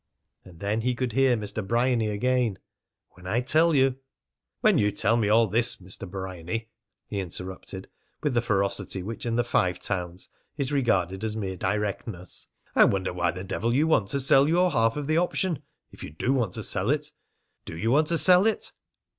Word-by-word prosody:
And 85 Hz, -3 st, -15 dB
then 105 Hz, +3 st, -1 dB
he 125 Hz, +2 st, 0 dB
could 125 Hz, -1 st, -2 dB
hear 130 Hz, +1 st, +3 dB
Mr. 105 Hz, 0 st, -4 dB
Bryany 115 Hz, +1 st, +1 dB
again: 120 Hz, -1 st, 0 dB, 0.5 s
"When 90 Hz, +1 st, -13 dB
I 110 Hz, +6 st, +1 dB
tell 160 Hz, +5 st, +3 dB
you 135 Hz, -1 st, +3 dB, 0.3 s
" -, -, -60 dB
"When -, -, +4 dB
you 105 Hz, 0 st, +2 dB
tell 110 Hz, +3 st, +1 dB
me 110 Hz, -3 st, +1 dB
all 115 Hz, +2 st, +5 dB
this, 115 Hz, +4 st, +3 dB
Mr. 95 Hz, +1 st, -8 dB
Bryany," 95 Hz, +4 st, -5 dB, 0.4 s
he 100 Hz, -, -4 dB
interrupted 95 Hz, +1 st, -6 dB, 0.4 s
with 150 Hz, -, 0 dB
the 120 Hz, -, +2 dB
ferocity 100 Hz, -3 st, -1 dB
which 115 Hz, +4 st, -5 dB
in 115 Hz, -, 0 dB
the 120 Hz, -, +2 dB
Five 90 Hz, -6 st, +1 dB
Towns 90 Hz, -2 st, -4 dB, 0.3 s
is 140 Hz, -1 st, -2 dB
regarded 95 Hz, -8 st, 0 dB
as 110 Hz, -1 st, -2 dB
mere 95 Hz, -3 st, -3 dB
directness, 95 Hz, -2 st, -2 dB, 0.3 s
"I -, -, +7 dB
wonder 95 Hz, -2 st, 0 dB
why 90 Hz, 0 st, 0 dB
the 90 Hz, +2 st, -5 dB
devil 115 Hz, +5 st, -1 dB
you 150 Hz, +4 st, +3 dB
want 135 Hz, -11 st, +2 dB
to 140 Hz, -, +1 dB
sell 135 Hz, +2 st, +5 dB
your 180 Hz, +2 st, +3 dB
half 115 Hz, -2 st, +2 dB
of 145 Hz, -, -3 dB
the 155 Hz, +2 st, +1 dB
option 175 Hz, -1 st, 0 dB, 0.3 s
if -, -, -12 dB
you -, -, -6 dB
do 85 Hz, -, -1 dB
want 115 Hz, -9 st, 0 dB
to 110 Hz, -, -3 dB
sell 95 Hz, +3 st, 0 dB
it. 150 Hz, +1 st, 0 dB, 0.5 s
Do 80 Hz, -, -7 dB
you 115 Hz, +6 st, 0 dB
want 150 Hz, +3 st, +3 dB
to 170 Hz, -, +2 dB
sell 185 Hz, +4 st, +6 dB
it?" 220 Hz, -, 0 dB
110 Hz, 195 wpm, -26 LUFS, 95-130 Hz, 0.5 s, I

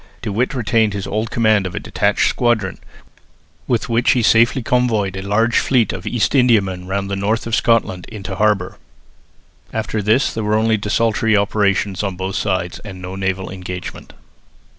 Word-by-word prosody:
De -, -, -3 dB
With 120 Hz, +6 st, -1 dB
retained 110 Hz, -3 st, +1 dB
his 100 Hz, -1 st, -4 dB
old 110 Hz, +3 st, -2 dB
command 110 Hz, -4 st, +2 dB
of 90 Hz, -, -8 dB
a -, -, -2 dB
detached -, -, +1 dB
squadron, 110 Hz, -6 st, 0 dB, 0.9 s
with 120 Hz, -3 st, 0 dB
which 120 Hz, 0 st, +2 dB
he 125 Hz, -, +1 dB
safely 115 Hz, +3 st, +4 dB
convoyed 110 Hz, -6 st, +1 dB
a 95 Hz, -, -4 dB
large 115 Hz, +5 st, +2 dB
fleet 125 Hz, -4 st, +1 dB
of -, -, -7 dB
East 120 Hz, -3 st, 0 dB
Indiamen 100 Hz, -9 st, +2 dB
round 100 Hz, +1 st, -2 dB
the 100 Hz, -, -2 dB
north 105 Hz, +3 st, -1 dB
of 115 Hz, -, -5 dB
Scotland 105 Hz, -6 st, +1 dB
into 100 Hz, -4 st, -6 dB
harbour. 105 Hz, -4 st, 0 dB, 0.9 s
After 110 Hz, -1 st, -2 dB
this 110 Hz, +7 st, +2 dB
there 110 Hz, -, -3 dB
were 105 Hz, +1 st, +1 dB
only 110 Hz, 0 st, +2 dB
desultory 110 Hz, +1 st, +1 dB
operations 100 Hz, -1 st, 0 dB
on 100 Hz, -3 st, -3 dB
both 95 Hz, +2 st, -4 dB
sides 95 Hz, -3 st, -2 dB
and 100 Hz, -3 st, -10 dB
no 90 Hz, +1 st, -7 dB
naval 95 Hz, -1 st, -2 dB
engagement. 90 Hz, -1 st, -7 dB
105 Hz, 170 wpm, -19 LUFS, 95-115 Hz, 0.9 s, safely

